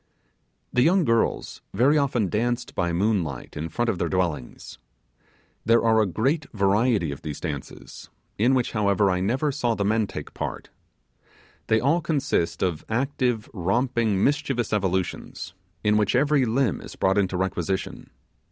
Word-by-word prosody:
The 125 - +3
young 175 +5 +4
girls 115 -2 0
very 135 +5 +4
often 135 -8 +1
danced 120 +6 -1
by 85 -1 0
moonlight 85 - -1
in 80 +2 -4
front 120 +9 -1
of 95 -6 -1
their 85 - 0
dwellings. 85 -8 -3 0.8
There 115 +2 +4
are 110 -1 +4
a 105 - +2
great 135 - 0
variety 100 - +2
of 70 - -7
these 75 -2 -6
dances, 75 -5 -7 0.3
in 125 +5 +4
which, 125 -2 0
however, 100 -2 +2
I 90 - 0
never 130 +10 0
saw 120 -5 0
the 100 - -1
men 110 0 +1
take - - -8
part. - - -5 1.0
They 110 - +3
all 145 +9 +2
consist 140 - 0
of 90 -5 -1
active, 125 -1 0
romping, 110 +1 +1
mischievous 140 -6 0
evolutions, 95 -2 -2 0.3
in 105 0 +3
which 105 +2 +1
every 140 0 +3
limb 120 - 0
is - - -10
brought 95 +1 +2
into 95 -2 0
requisition. 95 0 -3
110 Hz, 150 wpm, -25 LUFS, 95-125 Hz, 1.0 s, young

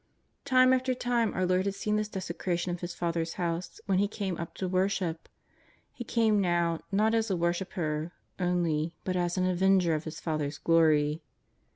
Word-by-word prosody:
Time 255 -1 +5
after 255 0 +1
time 240 -2 +1
our 185 - +1
Lord 185 +1 +2
had 200 - -2
seen 210 +1 -1
this 215 0 0
desecration 185 -2 -3
of 175 - -5
His 175 0 -5
Father's 170 -1 -2
House 170 0 -3
when 190 -2 +2
He 205 - +3
came 200 -3 -3
up 170 - -6
to 185 - -3
worship. 185 -2 -1 0.6
He 240 - -6
came 220 -3 +2
now, 170 -2 +1
not 215 +3 +2
as 225 -1 +1
a 190 - 0
worshipper 170 -2 -2 0.3
only 170 -3 0
but 185 - -2
as 175 0 0
an 185 - +2
Avenger 185 -1 +3
of 155 0 -2
His 155 -1 -6
Father's 150 -3 -2
glory. 155 -2 +3
180 Hz, 180 wpm, -29 LUFS, 165-200 Hz, 0.6 s, Time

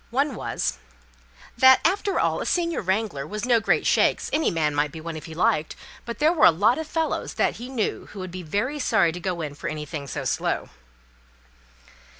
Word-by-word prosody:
One 275 +4 0
was 60 - -3 0.8
"That, 260 +1 +7
after 395 +3 +1
all, - - +1
a - - -3
senior 340 -2 0
wrangler 190 -7 -1
was 210 +6 -4
no 240 -2 +4
great 220 - +1
shakes. - - +2
Any 310 +1 +2
man 155 -4 0
might 145 0 0
be 160 - -8
one 165 +1 -6
if 155 - -8
he 160 - -9
liked, 175 -4 +1 0.3
but 235 - -5
there 310 +3 +3
were 320 - +6
a - - +9
lot 210 - +2
of 320 - -5
fellows 320 0 -2
that - - +1
he 245 +2 -8
knew 245 -5 -2
who - - -13
would 185 -2 -6
be 185 +1 -6
very 205 - -2
sorry 220 -10 +3
to 175 - -7
go 180 -2 -3
in 150 -2 -4
for 145 - -6
anything 150 -1 -5
so - - -5
slow." - - -1
205 Hz, 205 wpm, -24 LUFS, 160-260 Hz, 0.8 s, a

